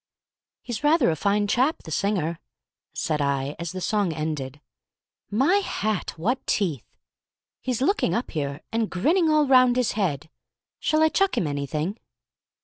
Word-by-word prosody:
"He's 240 0 -5
rather 295 - +4
a - - -1
fine 205 +5 +1
chap, 260 +9 +1
the 160 - -9
singer," 170 -3 -1 0.5
said 150 -1 -2
I, 140 0 -1
as 170 -1 -4
the 185 - -5
song 200 0 +1
ended. 150 -3 -4 0.7
"My 270 - +3
hat, 215 - -2
what 240 +11 -1
teeth! 165 - -2 0.6
He's 255 -1 -1
looking 405 +8 +1
up 235 - -2
here, 140 -1 -3
and 225 -1 0
grinning 320 - +2
all 305 -1 +4
round 255 -2 +5
his 250 -2 +1
head; 160 -7 -2 0.5
shall 310 0 +2
I 315 - +5
chuck 390 +4 +1
him - - +1
anything?" 150 - -3
205 Hz, 150 wpm, -25 LUFS, 155-255 Hz, 0.7 s, round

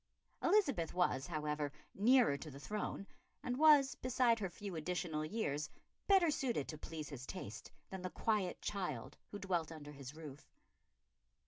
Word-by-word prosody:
Elizabeth 275 - +3
was, 175 -6 +2
however, 150 -3 -1 0.2
nearer 235 - +5
to 145 +3 -7
the 140 -1 -9
throne, 210 +3 -3 0.4
and 250 +1 -2
was, 295 -3 +7
beside 250 -2 +2
her 195 -3 -1
few 195 +1 -6
additional 160 -1 -2
years, 155 -5 -1 0.4
better 380 -5 +6
suited 245 - 0
to 155 - -5
please 155 -2 -6
his 130 -3 -7
taste 115 - -7 0.2
than 190 -1 -5
the 185 - -3
quiet 205 -2 0
child 150 - -3
who 205 - -5
dwelt 180 -5 -1
under 150 -2 -8
his 140 0 -9
roof. 150 -3 -10
180 Hz, 150 wpm, -37 LUFS, 150-225 Hz, 0.4 s, was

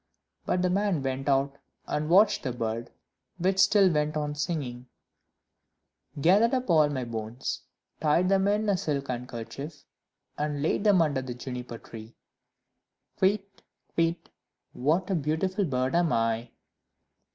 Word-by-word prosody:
But 180 - +1
the 180 - +2
man 195 -6 +1
went 135 +1 -2
out 140 0 +1 0.3
and 150 +1 -2
watched 200 +3 +5
the 130 - -2
bird, 115 0 -3 0.5
which 190 +2 +1
still 200 0 +6
went 150 0 0
on 150 -1 -2
singing 140 -5 -3 1.3
"Gathered 205 - +4
up 255 -7 -1
all 155 -3 +5
my 135 -3 -2
bones, 115 +1 -4 0.4
Tied 160 +4 +3
them 195 0 +3
in 210 +1 +1
a 200 -2 +2
silk 140 -5 -2
handkerchief, 125 +4 -6 0.5
And 145 -1 -1
laid 180 +6 0
them 195 -5 +6
under 145 -4 0
the 125 -2 -6
Juniper 125 -1 -6
tree: 115 0 -11 1.1
Kywitt! 200 +1 +1 0.3
Kywitt! 165 +1 0 0.4
what 160 +8 +1
a - - +2
beautiful 175 +5 0
bird 130 -3 -1
am 170 -1 +2
I!" 115 +1 0
150 Hz, 140 wpm, -28 LUFS, 125-185 Hz, 1.3 s, still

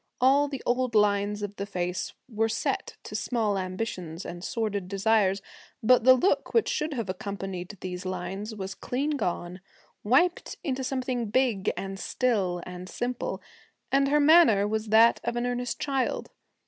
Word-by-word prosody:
All 275 +3 +4
the 275 -3 -6
old 250 -1 0
lines 205 0 +2
of 205 0 -5
the 200 - -3
face 180 -2 -3
were 225 -2 0
set - - -2
to - - -9
small 220 -5 0
ambitions 185 -3 -4
and 175 0 -7
sordid 205 -3 -2
desires, 195 -1 +2 0.4
but 245 +1 +5
the 260 0 +9
look 365 - +1
which 460 - +4
should 305 -1 -1
have 230 -5 -3
accompanied 195 0 -5
these 180 0 -5
lines 190 +4 -4
was 195 -1 -5
clean 275 +9 -2
gone 180 - -3 0.4
wiped 305 +11 +2
into 265 -5 -2
something 255 -3 -2
big 230 -4 +1
and 195 0 -5
still 195 -10 0
and 180 0 -8
simple 245 0 -3 0.5
and 275 0 +3
her 295 +2 +3
manner 290 -10 +6
was 220 +1 -2
that 225 +2 +5
of - - -2
an 240 0 -1
earnest 245 0 -2
child. 270 -3 -1
220 Hz, 160 wpm, -27 LUFS, 195-255 Hz, 0.5 s, the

